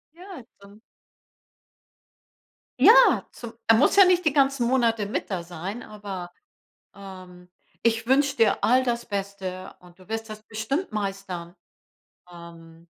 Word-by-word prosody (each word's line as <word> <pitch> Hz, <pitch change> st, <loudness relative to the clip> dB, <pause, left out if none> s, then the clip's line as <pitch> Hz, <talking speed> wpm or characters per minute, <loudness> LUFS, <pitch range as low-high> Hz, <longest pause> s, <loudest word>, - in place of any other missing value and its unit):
Ja, 360 Hz, -5 st, -11 dB, 0.2 s
dann 200 Hz, +1 st, -17 dB, 2.0 s
Ja, -, -, +6 dB
zum 235 Hz, -1 st, -10 dB
er 225 Hz, -, +6 dB
muss 250 Hz, -, +3 dB
ja 395 Hz, -1 st, +8 dB
nicht 360 Hz, -1 st, +2 dB
die 305 Hz, -, +2 dB
ganzen 275 Hz, -4 st, +2 dB
Monate 230 Hz, -4 st, +1 dB
mit 205 Hz, -, -4 dB
da 185 Hz, -4 st, -3 dB
sein, 180 Hz, +7 st, -7 dB
aber, 195 Hz, -4 st, -8 dB, 0.6 s
ähm, 185 Hz, -2 st, -13 dB, 0.4 s
ich 225 Hz, 0 st, +1 dB
wünsche 280 Hz, +2 st, +2 dB
dir 220 Hz, -3 st, +2 dB
all 255 Hz, +2 st, +3 dB
das 235 Hz, -1 st, -2 dB
Beste, 195 Hz, -3 st, -6 dB
und 180 Hz, 0 st, -20 dB
du 185 Hz, -, -18 dB
wirst 225 Hz, +1 st, -5 dB
das 215 Hz, 0 st, -10 dB
bestimmt 220 Hz, -, -4 dB
meistern. 195 Hz, -4 st, -5 dB, 0.8 s
Ähm. 170 Hz, -1 st, -14 dB
210 Hz, 135 wpm, -24 LUFS, 185-240 Hz, 2.0 s, ja